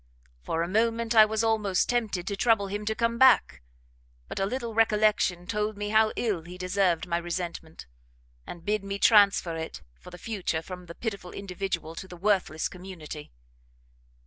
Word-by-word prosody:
For 160 Hz, -, -1 dB
a -, -, -2 dB
moment 230 Hz, +3 st, +1 dB
I 220 Hz, -2 st, +8 dB
was 220 Hz, +1 st, -1 dB
almost 210 Hz, -4 st, +1 dB
tempted 220 Hz, -7 st, -1 dB
to 200 Hz, -, -2 dB
trouble 220 Hz, -1 st, +2 dB
him 205 Hz, +2 st, -4 dB
to 220 Hz, +1 st, -1 dB
come 230 Hz, 0 st, 0 dB
back; 260 Hz, -, +5 dB, 0.7 s
but -, -, -5 dB
a 195 Hz, -, +1 dB
little 235 Hz, 0 st, -4 dB
recollection 215 Hz, -5 st, +2 dB
told 210 Hz, +1 st, -2 dB
me 205 Hz, 0 st, -3 dB
how 215 Hz, 0 st, +4 dB
ill 210 Hz, -8 st, -1 dB
he 175 Hz, +2 st, -11 dB
deserved 185 Hz, -2 st, +1 dB
my 170 Hz, -1 st, -1 dB
resentment, 170 Hz, -, -5 dB, 0.6 s
and 170 Hz, -, -9 dB
bid 210 Hz, -1 st, 0 dB
me 200 Hz, 0 st, -4 dB
transfer 200 Hz, -5 st, +4 dB
it 160 Hz, -, -6 dB, 0.2 s
for -, -, -12 dB
the 180 Hz, -, -10 dB
future 185 Hz, -6 st, -3 dB
from 180 Hz, 0 st, -9 dB
the 170 Hz, -, -9 dB
pitiful 200 Hz, -6 st, -5 dB
individual 185 Hz, -4 st, -4 dB
to 190 Hz, -, -8 dB
the 180 Hz, -, -11 dB
worthless 185 Hz, -5 st, 0 dB
community. 175 Hz, -5 st, -9 dB
200 Hz, 170 wpm, -27 LUFS, 175-220 Hz, 0.7 s, I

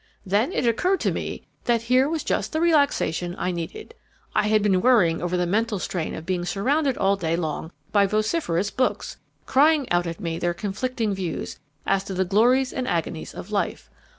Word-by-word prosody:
Then 205 Hz, -, +1 dB
it 265 Hz, -, -1 dB
occurred 360 Hz, -, +2 dB
to -, -, +1 dB
me -, -, -4 dB, 0.2 s
that 235 Hz, -2 st, +2 dB
here 255 Hz, +4 st, +3 dB
was 320 Hz, -1 st, -2 dB
just -, -, -1 dB
the 315 Hz, -, +1 dB
relaxation 285 Hz, -, +2 dB
I 180 Hz, -, -1 dB
needed. 175 Hz, -, -6 dB, 0.4 s
I 210 Hz, 0 st, +2 dB
had 215 Hz, -1 st, +3 dB
been 190 Hz, -3 st, +3 dB
worrying 195 Hz, -10 st, +4 dB
over 175 Hz, +1 st, -1 dB
the 180 Hz, -, +1 dB
mental 215 Hz, +4 st, 0 dB
strain 175 Hz, -3 st, -3 dB
of 160 Hz, -, -8 dB
being 180 Hz, -1 st, -1 dB
surrounded 260 Hz, -, 0 dB
all 195 Hz, 0 st, +3 dB
day 165 Hz, -4 st, -1 dB
long 160 Hz, -1 st, -3 dB, 0.2 s
by 200 Hz, -1 st, +4 dB
vociferous 210 Hz, -, 0 dB
books, 255 Hz, +3 st, -1 dB, 0.3 s
crying 290 Hz, 0 st, +4 dB
out 175 Hz, 0 st, +2 dB
at 165 Hz, 0 st, -5 dB
me 165 Hz, -1 st, -3 dB
their 175 Hz, 0 st, -1 dB
conflicting 220 Hz, +3 st, -2 dB
views 185 Hz, -3 st, -4 dB, 0.3 s
as 195 Hz, 0 st, +1 dB
to 195 Hz, -, -5 dB
the 190 Hz, +1 st, +1 dB
glories 245 Hz, +7 st, +3 dB
and 255 Hz, -1 st, -3 dB
agonies 165 Hz, -1 st, -3 dB
of 200 Hz, -, -8 dB
life. 205 Hz, -, -2 dB
205 Hz, 190 wpm, -24 LUFS, 175-255 Hz, 0.4 s, worrying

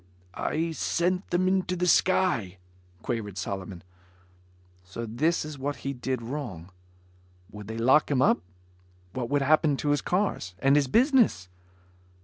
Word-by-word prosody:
"I 165 Hz, -, -2 dB
sent 180 Hz, +3 st, -1 dB
them 180 Hz, +1 st, +1 dB
into 185 Hz, -1 st, +1 dB
the 180 Hz, 0 st, -1 dB
sky," 175 Hz, -, +2 dB, 0.5 s
quavered 105 Hz, -5 st, -4 dB
Solomon. 95 Hz, -1 st, -5 dB, 1.0 s
So 95 Hz, +6 st, -7 dB
this 150 Hz, +10 st, 0 dB
is 150 Hz, -2 st, -8 dB
what 145 Hz, +2 st, -2 dB
he 140 Hz, -, -1 dB
did 125 Hz, -1 st, -3 dB
wrong. 115 Hz, -, -6 dB, 0.8 s
Would 105 Hz, -1 st, -10 dB
they 110 Hz, +1 st, -5 dB
lock 130 Hz, +6 st, +4 dB
him 140 Hz, -3 st, +1 dB
up? 130 Hz, -, +4 dB, 0.7 s
What 120 Hz, -2 st, -3 dB
would 145 Hz, 0 st, +1 dB
happen 150 Hz, 0 st, +3 dB
to 145 Hz, -, -2 dB
his 145 Hz, -1 st, +2 dB
cars? 180 Hz, -, -1 dB
And 135 Hz, +5 st, +3 dB
his 145 Hz, -2 st, +3 dB
business? 230 Hz, -, +3 dB
140 Hz, 140 wpm, -27 LUFS, 110-170 Hz, 1.0 s, lock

